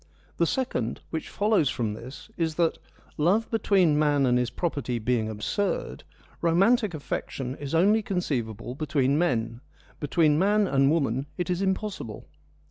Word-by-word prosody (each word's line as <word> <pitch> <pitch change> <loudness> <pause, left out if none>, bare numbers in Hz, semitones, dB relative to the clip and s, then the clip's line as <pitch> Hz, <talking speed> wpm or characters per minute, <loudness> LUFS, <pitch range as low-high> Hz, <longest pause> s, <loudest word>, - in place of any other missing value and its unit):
The 170 - +2
second, 125 - -2
which 160 - -4
follows 205 -8 +2
from 110 -5 -2
this, 125 - -10
is 165 -3 -1
that, 165 -1 +1 0.4
love 190 +9 +2
between 190 -8 +3
man 145 -2 +3
and 125 -1 +3
his 125 -2 0
property 140 -6 -2
being 115 -1 0
absurd, 205 - -2 0.4
romantic 195 +4 +3
affection 135 -3 -4
is 145 +2 -4
only 205 +6 +4
conceivable 125 - -3
between 145 -1 +1
men; 115 -7 0 0.4
between 150 0 +2
man 205 +3 +3
and 135 -2 +3
woman 140 -4 0
it 180 -1 -2
is 180 +1 -1
im 190 -1 +2
possible. 190 - -7
155 Hz, 145 wpm, -26 LUFS, 125-190 Hz, 0.4 s, only